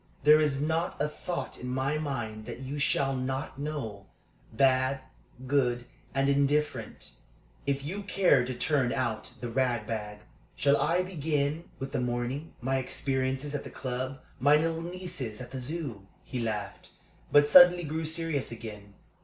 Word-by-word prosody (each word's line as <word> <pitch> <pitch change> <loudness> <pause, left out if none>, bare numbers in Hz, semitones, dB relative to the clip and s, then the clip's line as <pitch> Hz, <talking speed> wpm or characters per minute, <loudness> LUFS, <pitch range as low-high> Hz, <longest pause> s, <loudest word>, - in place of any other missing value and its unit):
There 150 +1 +8
is 150 -3 +2
not 160 +4 -1
a 150 - +2
thought 170 +3 -5
in 125 - -5
my 135 +4 0
mind 120 -8 -4
that - - -6
you 135 +2 -4
shall 135 -1 +2
not 130 +1 -3
know 125 -10 -4 0.4
bad, 130 +2 +3 0.4
good, 125 -3 +1 0.3
and 135 0 +2
indifferent 140 +2 0 0.6
if 140 0 0
you 185 +8 -4
care 190 -9 +4
to 130 +1 -3
turn 130 0 +1
out 120 -3 -2
the 120 - -3
rag 120 -2 0
bag. 105 -1 -4 0.3
Shall 140 +1 +4
I 180 +2 +2
begin 155 -2 -1
with 135 0 -5
the 135 -3 -1
morning 125 +5 -3
my 135 +2 +1
experiences 130 +2 -1
at 145 - -2
the - - -8
club, 130 +1 -4 0.2
my 145 +4 +6
little 165 +1 +1
nieces 170 -10 -5
at 125 0 -8
the 130 -1 -5
Zoo?" 130 - -4 0.2
He 130 - -5
laughed, 105 -4 -4 0.4
but 145 0 +6
suddenly 175 +2 +8
grew 160 +1 -2
serious 160 -4 -1
again. 105 -3 -8
135 Hz, 155 wpm, -29 LUFS, 125-150 Hz, 0.6 s, There